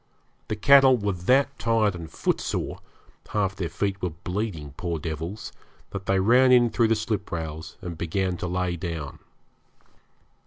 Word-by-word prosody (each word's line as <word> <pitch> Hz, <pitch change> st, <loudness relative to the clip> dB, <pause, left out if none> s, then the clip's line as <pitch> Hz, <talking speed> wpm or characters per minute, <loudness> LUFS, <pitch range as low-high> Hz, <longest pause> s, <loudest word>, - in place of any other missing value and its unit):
The 110 Hz, -, -2 dB
cattle 135 Hz, +3 st, +6 dB
were 105 Hz, -2 st, -1 dB
that 125 Hz, +10 st, +1 dB
tired 115 Hz, -3 st, +2 dB
and 85 Hz, -2 st, -8 dB
footsore -, -, -2 dB, 0.5 s
half 100 Hz, -3 st, 0 dB
their 90 Hz, -4 st, -3 dB
feet 95 Hz, +3 st, -2 dB
were 90 Hz, -, 0 dB
bleeding, 85 Hz, -3 st, -4 dB
poor 85 Hz, 0 st, -3 dB
devils 80 Hz, +6 st, -5 dB, 0.4 s
that 100 Hz, -1 st, -6 dB
they 95 Hz, 0 st, +3 dB
ran 125 Hz, +6 st, +5 dB
in 120 Hz, -2 st, +5 dB
through 115 Hz, +1 st, +3 dB
the 115 Hz, -, +3 dB
sliprails 85 Hz, -8 st, -4 dB
and 85 Hz, -3 st, -6 dB
began 90 Hz, +2 st, -1 dB
to 90 Hz, -, -4 dB
lay 90 Hz, 0 st, -1 dB
down. 80 Hz, -5 st, -5 dB
95 Hz, 150 wpm, -25 LUFS, 85-110 Hz, 0.5 s, cattle